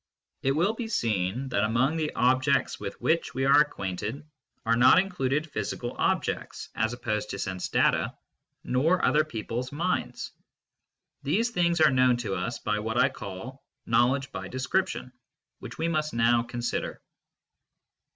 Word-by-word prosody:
JU^ 135 Hz, -, +2 dB
It__will 185 Hz, +8 st, +2 dB
be 230 Hz, -1 st, -4 dB
seen 115 Hz, -, -1 dB
that 100 Hz, -5 st, +1 dB
among 120 Hz, +8 st, +2 dB
the 155 Hz, -2 st, -1 dB
objects 130 Hz, +3 st, +2 dB
with -, -, -6 dB
which 165 Hz, -5 st, 0 dB
we 135 Hz, +1 st, 0 dB
are 140 Hz, +2 st, +7 dB
acquainted 105 Hz, +1 st, -3 dB, 0.4 s
are 115 Hz, +1 st, +3 dB
not 125 Hz, +8 st, +6 dB
included 155 Hz, -5 st, 0 dB
physical 120 Hz, -3 st, -4 dB
objects -, -, -1 dB
(as 110 Hz, +1 st, 0 dB
opposed 110 Hz, -3 st, -3 dB
to 100 Hz, -, -4 dB
sense 95 Hz, -2 st, -3 dB
data), -, -, +2 dB, 0.5 s
nortrther 155 Hz, +4 st, +3 dB
people 115 Hz, 0 st, -4 dB
s 125 Hz, 0 st, -5 dB
minds. 170 Hz, +5 st, -2 dB, 0.9 s
These 235 Hz, +2 st, +1 dB
things 170 Hz, -5 st, +1 dB
are 155 Hz, -2 st, +6 dB
known 130 Hz, -1 st, +4 dB
to 115 Hz, -5 st, -3 dB
us 90 Hz, -1 st, -2 dB
by 105 Hz, 0 st, -1 dB
what 110 Hz, +2 st, -3 dB
I 130 Hz, +2 st, +5 dB
call 115 Hz, +3 st, -8 dB
" 135 Hz, -, -58 dB
knowledge 130 Hz, +4 st, +2 dB
by 95 Hz, -1 st, -6 dB
/^description 130 Hz, +1 st, -1 dB, 0.5 s
fl^hich -, -, -8 dB
we 165 Hz, -, 0 dB
must 155 Hz, -4 st, -1 dB
now 115 Hz, +1 st, +4 dB
consider. 120 Hz, 0 st, -3 dB
130 Hz, 150 wpm, -27 LUFS, 115-150 Hz, 0.9 s, are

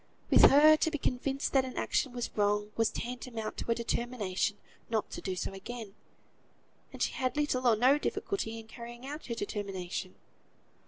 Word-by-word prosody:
With -, -, +9 dB
her, 305 Hz, +3 st, +8 dB
to 320 Hz, -, +2 dB
be 310 Hz, -, -2 dB
convinced 270 Hz, +1 st, -1 dB
that 270 Hz, -1 st, +5 dB
an 255 Hz, -1 st, -7 dB
action 265 Hz, -, 0 dB
was 245 Hz, -1 st, -4 dB
wrong, 210 Hz, 0 st, +1 dB
was 225 Hz, -1 st, +2 dB
tantamount 240 Hz, -2 st, -5 dB
to -, -, -5 dB
a 230 Hz, -, +3 dB
determination 230 Hz, -4 st, -1 dB, 0.3 s
not 220 Hz, -2 st, -1 dB
to -, -, -6 dB
do 190 Hz, -2 st, -3 dB
so 185 Hz, -, -3 dB
again; 215 Hz, +1 st, -7 dB, 1.0 s
and -, -, -2 dB
she -, -, +1 dB
had 255 Hz, +2 st, -2 dB
little 260 Hz, -4 st, +1 dB
or 230 Hz, -, +6 dB
no 255 Hz, +6 st, +4 dB
difficulty 230 Hz, -, -2 dB
in 225 Hz, -1 st, -10 dB
carrying 240 Hz, +2 st, -9 dB
out 295 Hz, +3 st, -7 dB
her 235 Hz, -, -3 dB
determination. 195 Hz, -3 st, -4 dB
235 Hz, 175 wpm, -31 LUFS, 210-260 Hz, 1.0 s, With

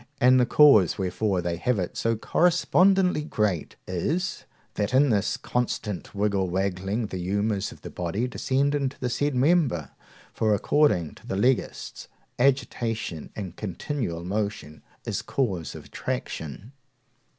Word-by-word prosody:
and 130 Hz, +1 st, +6 dB
the 125 Hz, -, +3 dB
cause 135 Hz, -, +6 dB
wherefore 95 Hz, 0 st, -1 dB
they 85 Hz, -1 st, -2 dB
have 125 Hz, +6 st, 0 dB
it 90 Hz, -3 st, -3 dB
so 115 Hz, 0 st, 0 dB
correspondently 180 Hz, -, +3 dB
great 105 Hz, -, -1 dB
is, 160 Hz, -, -2 dB, 0.3 s
that 105 Hz, +5 st, -1 dB
in 140 Hz, 0 st, +5 dB
this 105 Hz, -1 st, +1 dB
constant 110 Hz, -6 st, -3 dB
wig 105 Hz, 0 st, +1 dB
wagging 95 Hz, +3 st, -1 dB
the 95 Hz, -3 st, -5 dB
humours 100 Hz, +2 st, -1 dB
of -, -, -14 dB
the -, -, -6 dB
body 90 Hz, +8 st, -2 dB
descend 135 Hz, +3 st, 0 dB
into 140 Hz, -2 st, -1 dB
the 125 Hz, -1 st, -2 dB
said 145 Hz, +3 st, 0 dB
member. 130 Hz, -, +2 dB, 0.4 s
For, 110 Hz, -2 st, +2 dB
according 100 Hz, -, +2 dB
to -, -, -16 dB
the -, -, -2 dB
Legists, 125 Hz, +5 st, -1 dB, 0.3 s
agitation 115 Hz, -, 0 dB
and 95 Hz, -4 st, -6 dB
continual 100 Hz, -, -4 dB
motion 100 Hz, -5 st, -3 dB, 0.2 s
is -, -, -2 dB
cause 95 Hz, -, -2 dB
of -, -, -10 dB
attraction. 80 Hz, -, -5 dB
110 Hz, 140 wpm, -26 LUFS, 95-130 Hz, 0.4 s, and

